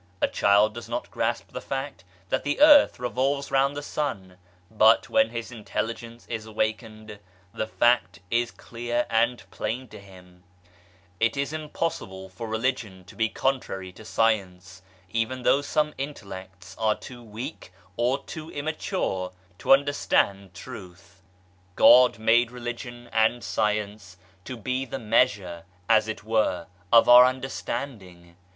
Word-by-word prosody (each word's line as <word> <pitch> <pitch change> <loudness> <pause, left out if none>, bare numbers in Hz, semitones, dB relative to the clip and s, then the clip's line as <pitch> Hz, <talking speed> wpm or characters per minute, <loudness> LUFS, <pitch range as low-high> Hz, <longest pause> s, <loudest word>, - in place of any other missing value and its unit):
A - - +2
child 105 +1 +3
does 120 0 -9
not 120 +1 -4
grasp 115 +1 -2
the - - -6
fact 135 -8 -5 0.3
that - - 0
the 145 0 -1
earth 295 -1 +7
revolves 135 +3 -1
round 135 +1 +2
the 145 - -5
sun, 95 -13 -4 0.3
but, 110 +1 +4
when 275 0 +4
his 115 +1 -6
intelligence 115 +1 -5
is 110 -2 -5
awakened, 110 -1 -4 0.3
the 110 - -3
fact 120 -6 +2
is 120 0 +1
clear 120 +1 -3
and 120 +2 +1
plain 125 +3 -4
to - - -11
him, 90 -2 -17 0.8
It 115 +3 +1
is 140 +2 -2
impossible 150 - -4
for 95 +5 -7
Religion 110 -4 -2
to 90 - -15
be 115 -1 +1
contrary 95 -10 -2
to 105 - -14
Science, 95 -5 -1 0.3
even 115 +3 -2
though 140 - +4
some 150 +1 0
intellects 95 -9 -8
are 110 -1 +2
too 125 -2 -11
weak 115 - -8 0.2
or 125 +5 0
too 155 0 -8
immature 145 - -3 0.3
to - - -1
understand 100 -9 +2
Truth. 95 -4 -11 0.5
God 125 -1 +7
made 115 +2 +3
Religion 120 0 -7
and 110 +2 +2
Science 105 -3 -2 0.3
to 130 - -6
be 130 +4 -2
the 135 0 -5
measure, 105 -7 +1 0.2
as 110 -1 +4
it 110 -2 -5
were, 110 -6 0 0.3
of 115 - +7
our 125 +1 +10
understanding. 120 -9 -5
115 Hz, 140 wpm, -26 LUFS, 100-130 Hz, 0.8 s, our